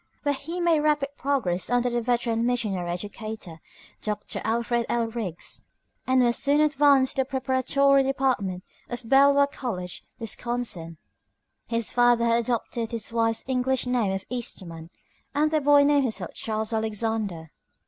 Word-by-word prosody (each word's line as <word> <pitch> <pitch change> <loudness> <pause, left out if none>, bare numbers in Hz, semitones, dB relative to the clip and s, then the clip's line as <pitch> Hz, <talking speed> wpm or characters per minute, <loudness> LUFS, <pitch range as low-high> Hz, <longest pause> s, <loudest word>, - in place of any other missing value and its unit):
where 285 -1 +1
he 325 +6 -6
made 340 -3 +3
rapid 295 -2 +1
progress 245 -11 -1
under 245 0 +2
the 240 -1 0
veteran 235 -1 0
missionary 215 -8 -1
educator, 205 -2 -6 0.4
Dr. 210 -1 -4
Alfred 235 +1 0
L. 235 -1 +1
Riggs, 205 -8 -4 0.4
and 255 -1 +4
was 240 -1 +3
soon 285 +1 +3
advanced 285 -3 +3
to - - +4
the - - -1
preparatory 270 +1 +2
department 255 -9 -1 0.3
of 240 -1 -6
Beloit 280 +2 +5
College, 180 -9 -5
Wisconsin. 225 -7 -2 0.7
His 230 -1 -1
father 240 -1 +4
had 230 0 +3
adopted 235 -1 -2
his 230 -1 -3
wife's 225 0 0
English 260 0 0
name 245 -5 +1
of 195 0 -4
Eastman, 170 -9 -5 0.5
and 305 +1 +2
the 310 -1 +2
boy 285 0 +6
named 290 0 +4
himself 225 - -3
Charles 220 0 -3
Alexander. 220 -6 -2
240 Hz, 145 wpm, -25 LUFS, 220-270 Hz, 0.7 s, boy